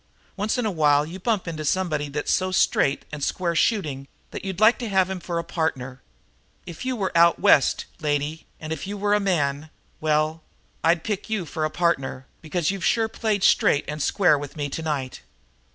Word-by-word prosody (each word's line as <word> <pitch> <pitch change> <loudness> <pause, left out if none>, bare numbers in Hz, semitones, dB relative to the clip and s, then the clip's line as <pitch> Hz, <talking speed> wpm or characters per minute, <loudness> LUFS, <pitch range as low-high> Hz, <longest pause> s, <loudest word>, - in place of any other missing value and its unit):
Once 210 +3 -1
in 245 - -1
a 215 - 0
while 150 -3 +3
you 175 +4 -8
bump 210 -2 -1
into 155 -2 -4
somebody 155 -3 0
that's 145 +1 -1
so 185 0 0
straight 140 -5 +2
and 150 -1 -5
square 175 -2 -1
shooting 150 - 0 0.2
that - - -7
you'd 190 -2 -4
like 215 +3 +5
to 235 -3 -4
have 190 -1 +2
him 190 - -4
for 175 -1 -4
a 170 - -1
partner. 135 -7 -3 0.6
If 170 +8 -8
you 260 0 -1
were 195 -6 -3
out 170 0 +5
West, 140 - +4
lady, 150 +1 -2
and 155 0 -4
if 160 +4 -6
you 205 +1 -4
were 205 +1 +1
a 210 - +4
man 155 -6 0 0.3
well, 155 +1 0 0.4
I'd 165 0 +3
pick 210 0 -3
you 215 -5 -1
for 155 0 -3
a - - -1
partner, 140 -7 -1 0.2
because 165 +1 -1
you've 195 -3 -5
sure 225 +2 +2
played 220 -3 -1
straight 140 - +4
and 150 +1 -4
square 175 -3 +3
with 145 +1 -8
me 145 -1 -2
tonight." 145 -4 -4
165 Hz, 200 wpm, -24 LUFS, 150-195 Hz, 0.6 s, like